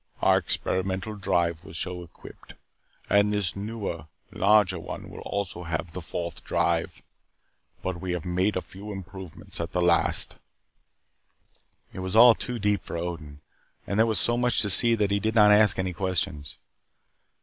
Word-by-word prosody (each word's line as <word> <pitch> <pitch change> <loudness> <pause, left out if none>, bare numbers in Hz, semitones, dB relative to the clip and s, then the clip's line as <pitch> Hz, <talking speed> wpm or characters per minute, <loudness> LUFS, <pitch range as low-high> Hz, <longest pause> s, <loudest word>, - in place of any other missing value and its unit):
Our - - +4
experimental 95 +3 -2
ship 85 -3 0
was 95 -4 -9
so 90 +1 -3
equipped. 85 - -14 0.5
And 100 +1 +3
this 100 -5 -1
newer, 100 -6 -5 0.2
larger 100 -3 +3
one - - -8
will - - -10
also 100 -3 -4
have 80 +1 -4
The 90 - -6
Fourth 85 0 -6
Drive. - - -1 0.8
But 95 -2 -4
we 90 -1 -3
have 90 -3 -4
made 90 +4 0
a 95 - -2
few 100 +3 -10
improvements 95 -2 -8
at 85 +1 -5
the 90 - 0
last." 85 -1 +3 1.6
It - - -7
was 95 +2 -4
all 120 +1 +9
too 125 +2 -4
deep 105 -3 0
for 85 - -6
Odin. 80 -4 -6 0.4
And 100 - -2
there 115 - +5
was 110 - +2
so 120 0 +2
much 125 -1 +3
to 100 - +1
see 115 +4 +6
that 105 -2 0
he 100 - +2
did 110 +2 -2
not 105 -2 +7
ask 105 0 +5
any 95 -1 -2
questions. 90 -5 -3
95 Hz, 165 wpm, -26 LUFS, 85-105 Hz, 1.6 s, all